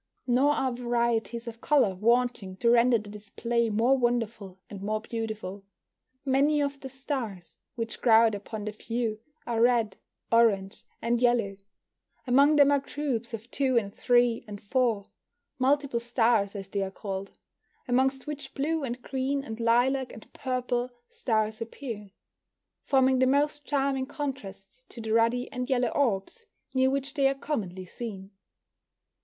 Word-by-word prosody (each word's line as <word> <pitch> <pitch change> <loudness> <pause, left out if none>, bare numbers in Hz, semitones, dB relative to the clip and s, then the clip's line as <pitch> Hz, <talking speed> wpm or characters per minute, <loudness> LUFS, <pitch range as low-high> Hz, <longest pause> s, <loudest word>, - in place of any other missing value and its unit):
Nor 265 +4 +3
are 265 -3 0
varieties 235 -1 -1
of 230 0 -8
colour 275 -10 +3
wanting 230 -1 +1
to 235 +3 +3
render 240 0 +5
the 210 -1 -9
display 230 +3 -1
more 230 +5 +3
wonderful 230 -6 -1
and 200 -2 -9
more 215 +2 -1
beautiful. 215 -3 -5 0.6
Many 280 +3 +3
of 280 -1 -1
the 265 - -7
stars 250 - -5 0.2
which 230 -2 -5
crowd 225 -2 +6
upon 205 +1 -6
the 215 - -2
view 225 0 -3 0.3
are 230 -1 -1
red, 235 -3 +3 0.3
orange, 205 -4 +2 0.2
and 235 +1 +1
yellow 235 -5 +2 0.7
Among 280 +4 +5
them 285 -1 +6
are 285 - +4
groups 260 -5 -3
of 225 +2 -12
two 265 -3 +1
and 200 -3 0
three 240 -1 +2
and 205 -1 -7
four 225 -2 0 0.5
(multiple 270 -1 +2
stars 230 -4 +1
as 195 -1 -6
they 200 0 -2
are 195 - -1
called), 195 0 -6 0.5
amongst 265 +2 +1
which 290 -2 -7
blue 310 +2 -1
and 245 -1 -3
green 270 +1 -1
and 225 -3 -7
lilac 245 +3 +2
and 220 - -13
purple 250 -1 -2 0.2
stars 220 - -1
appear, 230 -3 -6 0.7
forming 265 -1 +3
the 260 - +4
most 290 +2 +1
charming 270 -2 0
contrast 255 -6 -7
to - - -10
the 220 -1 -2
ruddy 230 +2 +2
and 250 +1 -4
yellow 250 -2 +2
orbs 275 - -1 0.3
near 260 0 +3
which 275 0 -2
they 275 -3 +3
are 270 - +1
commonly 195 - -4
seen. 195 -1 -7
240 Hz, 150 wpm, -28 LUFS, 220-265 Hz, 0.7 s, crowd